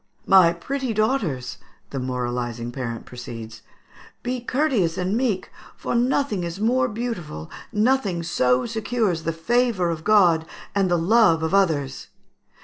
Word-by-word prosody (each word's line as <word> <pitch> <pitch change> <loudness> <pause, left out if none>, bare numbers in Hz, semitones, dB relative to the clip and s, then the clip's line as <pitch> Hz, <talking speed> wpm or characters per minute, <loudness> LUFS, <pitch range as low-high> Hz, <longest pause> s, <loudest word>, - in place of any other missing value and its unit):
"My 185 -3 +6
pretty 255 +7 -3
daughters," 200 - -1 0.3
the 135 - -3
moralising 120 -2 -3
parent 120 -3 -5
proceeds, 115 -3 -9 0.6
"be 250 +1 -2
courteous 245 - 0
and 185 +3 -1
meek, 225 -6 -1 0.3
for - - -3
nothing 245 -4 +1
is 170 +2 -5
more 245 +4 +2
beautiful, 205 - -5 0.2
nothing 210 -6 +1
so 125 -5 +2
secures 220 -5 -1
the 165 - +1
favour 200 +1 +1
of 160 -1 -5
God 175 -6 +4 0.3
and 195 -2 +2
the 175 - +3
love 175 -2 +4
of 160 +3 -1
others. 155 -9 +1
180 Hz, 135 wpm, -23 LUFS, 145-230 Hz, 0.6 s, My